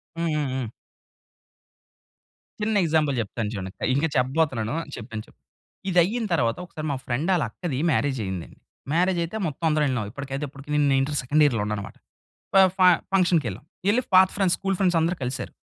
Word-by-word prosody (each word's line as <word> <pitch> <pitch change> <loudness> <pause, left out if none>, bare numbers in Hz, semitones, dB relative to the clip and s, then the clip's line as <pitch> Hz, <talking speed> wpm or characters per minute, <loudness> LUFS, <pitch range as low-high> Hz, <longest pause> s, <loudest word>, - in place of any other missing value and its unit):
హ్మ్. 165 0 -1
హ్మ్. 150 -2 0
హ్మ్. 130 -3 -2 1.9
చిన్న 210 0 +1
ఎగ్జాంపుల్ 155 -3 +2
జెప్తాను 110 0 -4
చూడండి. 95 -1 -5 0.2
ఇంక 145 +4 +2
చెప్పబోతున్నాను 130 -3 +1 0.2
చెప్తాను 110 -2 -6
చెప్ - - -22 0.5
ఇది 180 - -1
అయ్యిన 225 +6 -1
తర్వాత 115 -8 +1
ఒకసారి 155 -3 -7
మా - - -1
ఫ్రెండ్ 140 +8 -1
ఆళ్ళ 175 -5 +2
అక్కది 150 +3 -4
మ్యారేజ్ 135 -2 0
అయింది 95 -3 -4
అండి. - - -19 0.4
మ్యారేజ్ 180 +1 +2
అయితే 170 +6 -4
మొత్తం 155 +2 -4
అందరం 150 -1 +2
ఎళ్ళాం. 125 -4 -1
ఇప్పటికైతే 140 +2 -4
ఇప్పటికి 140 +2 -13
నేను 145 -2 +3
ఇంటర్ 145 +2 -1
సెకండ్ 145 +5 +2
ఇయర్‌లో 120 -7 +1
ఉన్నాననమాట. 105 -1 -4 0.6
ఫ - - -13 0.2
ఫ - - -5 0.3
ఫంక్షన్‌కి 175 -7 +3
ఎళ్ళాం. 105 +8 -9 0.3
ఎళ్లి 240 +4 +2
పాత 185 0 +8
ఫ్రెండ్స్ 195 -3 +2
స్కూల్ 195 -1 -1
ఫ్రెండ్స్ 180 -3 +2
అందరూ 170 +3 +1
కలిసారు. 125 +1 -4
145 Hz, 170 wpm, -25 LUFS, 125-170 Hz, 1.9 s, పాత